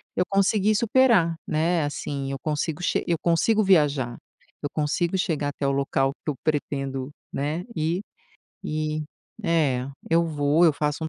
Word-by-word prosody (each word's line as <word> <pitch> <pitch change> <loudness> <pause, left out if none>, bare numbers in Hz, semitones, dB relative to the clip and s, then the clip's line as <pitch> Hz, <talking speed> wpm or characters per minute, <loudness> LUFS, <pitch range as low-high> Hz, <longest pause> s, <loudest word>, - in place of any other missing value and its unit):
eu - - +2
consegui 200 +1 +3
superar, 230 -7 +4
né. 165 +2 +1
Assim 140 -1 -3
eu 135 - -3
consigo 155 +3 -2
che - - 0
eu 170 - +1
consigo 175 +6 +3
viajar. 145 -10 +2 0.5
Eu 145 - -1
consigo 165 +4 0
chegar 155 -6 0
até 140 0 -3
o - - +2
local 135 0 +1
que - - -1
eu - - -7
pretendo, 135 -3 -2 0.2
né, 150 +5 -2
ir 165 +4 0 0.6
e 155 0 -2 0.4
é, 150 -8 +1 0.2
eu 165 +1 +4
vou 150 +1 +2
eu 160 - +5
faço 150 +1 -1
um - - -2
155 Hz, 155 wpm, -25 LUFS, 145-175 Hz, 0.6 s, eu